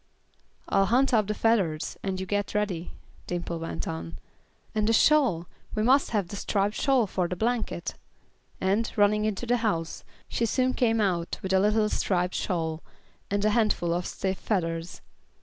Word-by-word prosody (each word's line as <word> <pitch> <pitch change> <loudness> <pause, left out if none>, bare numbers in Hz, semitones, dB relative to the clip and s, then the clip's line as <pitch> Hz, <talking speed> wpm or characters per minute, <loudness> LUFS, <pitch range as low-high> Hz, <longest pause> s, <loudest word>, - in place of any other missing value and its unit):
"I'll 195 0 +3
hunt 255 +4 +3
up 215 -3 +3
the 210 - -1
feathers, 195 -9 +1
and 190 -1 -2
you 190 - -3
get 205 +2 -2
ready," 190 -5 -2 0.3
Dimple 175 -1 -3
went 90 - -4
on. 85 0 -5 0.6
"And 215 0 +1
the - - +4
shawl 240 - +4 0.3
we 215 - +1
must 265 +4 +4
have 205 -6 -1
the - - -6
striped 200 0 0
shawl 265 0 +2
for 185 -2 -1
a 180 - -3
blanket," 220 -4 -1 0.7
and, 200 +4 +1
running 210 +1 +3
into 215 +2 -2
the 245 +1 +2
house, 170 -8 -2 0.2
she 230 - 0
soon 255 +2 +1
came 225 -3 +2
out 180 -5 0
with 190 0 -1
a 190 - +5
little 210 +2 +3
striped 180 -3 0
shawl, 160 -4 -2 0.5
and 200 +1 0
a 215 - +4
handful 210 -6 +2
of 175 +1 -2
stiff 190 -1 -3
feathers. 165 -4 -2
200 Hz, 170 wpm, -27 LUFS, 175-220 Hz, 0.7 s, a